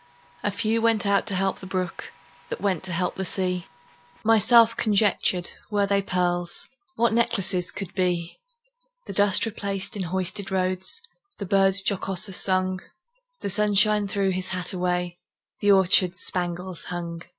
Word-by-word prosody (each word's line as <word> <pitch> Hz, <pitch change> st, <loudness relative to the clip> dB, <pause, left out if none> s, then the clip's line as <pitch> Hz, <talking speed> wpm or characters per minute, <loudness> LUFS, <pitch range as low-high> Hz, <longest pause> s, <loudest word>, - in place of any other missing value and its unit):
A -, -, -1 dB
few 215 Hz, +3 st, -1 dB
went 225 Hz, -2 st, +2 dB
out 200 Hz, 0 st, +1 dB
to 195 Hz, -, 0 dB
help 190 Hz, +1 st, -1 dB
the 190 Hz, -, -9 dB
brook, 185 Hz, -2 st, -4 dB, 0.4 s
That -, -, -5 dB
went 195 Hz, -4 st, -1 dB
to 185 Hz, -, -3 dB
help 180 Hz, +1 st, -2 dB
the 190 Hz, -, -2 dB
sea. 180 Hz, -2 st, -1 dB, 0.6 s
Myself 225 Hz, +1 st, +5 dB
conjectured, 200 Hz, -4 st, +1 dB, 0.2 s
Were 205 Hz, -1 st, +1 dB
they 200 Hz, 0 st, +1 dB
pearls, 175 Hz, -2 st, -1 dB, 0.3 s
What 235 Hz, -1 st, +1 dB
necklaces 190 Hz, -6 st, 0 dB
could 195 Hz, -4 st, -7 dB
be! 175 Hz, -3 st, -2 dB, 0.7 s
The -, -, -7 dB
dust 205 Hz, 0 st, +4 dB
replaced 200 Hz, -3 st, -2 dB
in 200 Hz, -, -4 dB
hoisted 190 Hz, +2 st, -2 dB
roads, 185 Hz, -, +2 dB, 0.4 s
The 200 Hz, -, -5 dB
birds 195 Hz, 0 st, +4 dB
jocoser 195 Hz, 0 st, -1 dB
sung; 185 Hz, 0 st, +1 dB, 0.6 s
The -, -, -3 dB
sunshine 210 Hz, +1 st, +3 dB
threw 195 Hz, -1 st, 0 dB
his 185 Hz, 0 st, -3 dB
hat 185 Hz, 0 st, -2 dB
away, 180 Hz, -1 st, -2 dB, 0.4 s
The 205 Hz, -, +3 dB
orchards 185 Hz, -1 st, +4 dB
spangles 180 Hz, -1 st, -3 dB
hung. 170 Hz, -1 st, -6 dB
190 Hz, 150 wpm, -24 LUFS, 180-205 Hz, 0.7 s, Myself